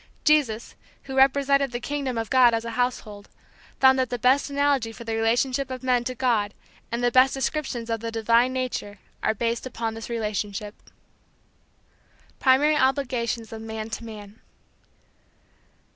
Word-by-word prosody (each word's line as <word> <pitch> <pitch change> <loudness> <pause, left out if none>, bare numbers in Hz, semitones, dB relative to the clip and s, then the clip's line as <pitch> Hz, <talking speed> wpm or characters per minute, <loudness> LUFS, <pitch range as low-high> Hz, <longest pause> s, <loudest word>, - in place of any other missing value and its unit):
Jesus, 265 -7 +2 0.3
who 265 -1 -7
represented 275 0 +3
the 240 - -3
kingdom 275 -1 -3
of 225 -1 -3
God 250 -3 +6
as 225 0 -3
a 230 - -4
household, 225 -4 -3 0.5
found 265 0 +5
that 255 -2 0
the 245 - -2
best 255 +5 +2
analogy 280 -5 +1
for 230 - -10
the 225 -1 -3
relationship 245 +4 +1
of 255 0 -6
men 250 -2 +2
to 255 - -3
God 230 -5 0 0.4
and 235 +1 -2
the 245 - +3
best 260 +2 +5
descriptions 270 -4 -3
of 225 -1 -2
the 230 +1 -4
divine 230 +2 +2
nature 255 -5 -4 0.2
are 220 - 0
based 230 +3 -2
upon 230 -3 -4
this 225 +1 -8
relationship. 210 -2 -3
V. - - -19 1.5
PRIMARY 285 +3 +4
OBLIGATIONS 245 -5 -1
OF 220 - -7
MAN 220 0 -6
TO 220 - -5
MAN. 210 -1 -10
240 Hz, 160 wpm, -25 LUFS, 225-265 Hz, 1.5 s, God